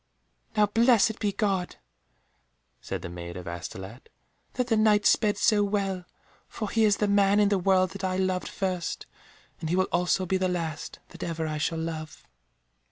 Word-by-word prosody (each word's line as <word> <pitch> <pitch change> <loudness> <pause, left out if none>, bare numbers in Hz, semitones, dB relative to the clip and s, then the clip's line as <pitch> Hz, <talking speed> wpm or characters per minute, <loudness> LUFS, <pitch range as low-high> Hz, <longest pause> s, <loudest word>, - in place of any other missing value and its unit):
"Now 210 - +6
blessed 225 0 +3
be 205 -2 0
God," 195 -4 -1 1.1
said - - -5
the - - -4
Maid 85 0 -7
of 90 -1 -8
Astolat, 95 +7 -8 0.4
"that 250 - 0
that 230 -2 +1
Knight 210 -1 +4
sped 210 -2 +3
so 215 -2 +3
well, 195 -3 -1 0.4
for 215 -3 -5
he 225 -1 +3
is 205 -2 +3
the 210 - +1
man 200 0 +4
in 205 -1 +4
the 200 -2 +2
world 185 0 +3
that 200 -1 -8
I 185 -1 0
loved 185 -1 0
first, 185 -3 -3 0.5
and 160 - -4
he 175 - +1
will 185 0 +2
also 180 +2 +1
be 190 +1 +1
the 185 0 0
last 165 -4 -4
that - - -13
ever 165 -1 -3
I 155 -1 -3
shall 165 +2 -1
love." 160 -1 -5
190 Hz, 180 wpm, -27 LUFS, 165-205 Hz, 1.1 s, Now